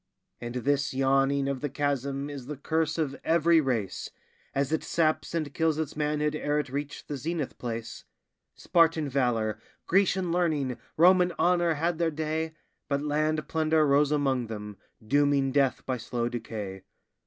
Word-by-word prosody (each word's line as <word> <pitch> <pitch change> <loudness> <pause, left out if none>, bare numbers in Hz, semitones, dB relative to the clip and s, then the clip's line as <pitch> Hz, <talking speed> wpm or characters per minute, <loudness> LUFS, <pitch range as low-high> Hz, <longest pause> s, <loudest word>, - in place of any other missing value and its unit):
And 120 0 -6
this 135 +2 0
yawning 135 +1 +2
of 140 -2 -2
the 145 - -2
chasm 140 0 -1
is 140 -4 -7
the 150 -1 -5
curse 160 +3 0
of 145 -4 -1
every 165 0 +4
race, 115 -9 -2 0.5
As 140 +1 0
it 160 - 0
saps 155 -1 0
and 155 -4 -2
kills 160 -2 +1
its 155 -2 -3
manhood 150 0 0
ere 150 -1 -1
it 150 -3 -1
reach 145 +2 -5
the 145 - -4
zenith 155 +1 -3
place; 115 -2 -5 0.5
Spartan 165 -3 +2
valor, 115 -5 0 0.3
Grecian 190 -1 +2
learning, 155 -8 0 0.2
Roman 180 +1 +5
honor 175 -2 +3
had 165 +2 -1
their 170 -1 +2
day, 160 +1 -2 0.4
But 140 0 0
land 155 +1 0
plunder 160 -1 +2
rose 145 +1 +3
among 135 -5 +1
them, 105 -2 -7 0.3
dooming 140 +1 +2
death 135 -1 +1
by 130 - -1
slow 120 +1 -2
decay. 105 -5 -6
145 Hz, 155 wpm, -28 LUFS, 135-160 Hz, 0.5 s, Roman